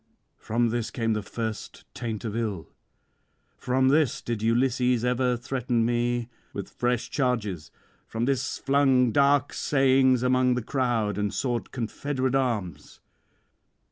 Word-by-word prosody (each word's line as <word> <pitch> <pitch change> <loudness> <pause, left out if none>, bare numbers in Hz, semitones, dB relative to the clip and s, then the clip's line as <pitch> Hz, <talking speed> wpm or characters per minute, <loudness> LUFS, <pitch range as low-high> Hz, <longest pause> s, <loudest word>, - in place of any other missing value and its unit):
From 115 +1 0
this 120 0 -2
came 115 -2 -1
the 105 - -1
first 110 +1 -6
taint 115 -2 -5
of 110 -1 -3
ill; 105 -9 -3 0.8
from 130 +1 +1
this 145 -3 +2
did 115 -3 -3
Ulysses 125 +1 +2
ever 125 0 +1
threaten 120 -2 -1
me 120 0 0 0.3
with - - -6
fresh 120 -1 -1
charges, 110 - -1 0.4
from 115 +1 -2
this 135 -1 -1
flung 135 -3 +3
dark 140 +2 +3
sayings 130 -2 +3
among 125 0 +3
the 125 - -2
crowd 115 -6 0
and 105 -1 0
sought 120 -3 -2
confederate 130 +2 -2
arms. 105 - -2
120 Hz, 130 wpm, -26 LUFS, 115-130 Hz, 0.8 s, flung